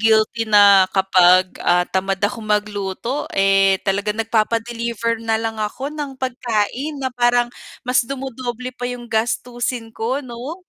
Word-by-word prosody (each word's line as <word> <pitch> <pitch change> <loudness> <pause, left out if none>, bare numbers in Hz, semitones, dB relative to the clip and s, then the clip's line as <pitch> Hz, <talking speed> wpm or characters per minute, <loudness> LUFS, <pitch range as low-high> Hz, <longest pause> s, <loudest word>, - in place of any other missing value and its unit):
guilty 220 +1 +2
na 200 -2 +6
kapag, 185 -1 +4
ah, 180 0 +3
tamad 195 +1 -1
ako 220 +3 -1
magluto, 210 +4 -2
eh, 195 0 +4
talaga 200 +1 0
nagpapa-deliver 230 +1 -1
na 225 -1 +1
lang 225 0 -3
ako 260 +7 -4
ng 295 -2 -5
pagkain 255 +3 -2
na 260 -2 -3
parang 240 0 +2 0.4
mas 250 0 +3
dumodoble 255 -2 -5
pa 245 0 -4
yung 245 -1 -7
gastusin 240 +1 -2
ko, 230 +5 -2
'no? 250 +6 -7
225 Hz, 135 wpm, -20 LUFS, 205-245 Hz, 0.4 s, na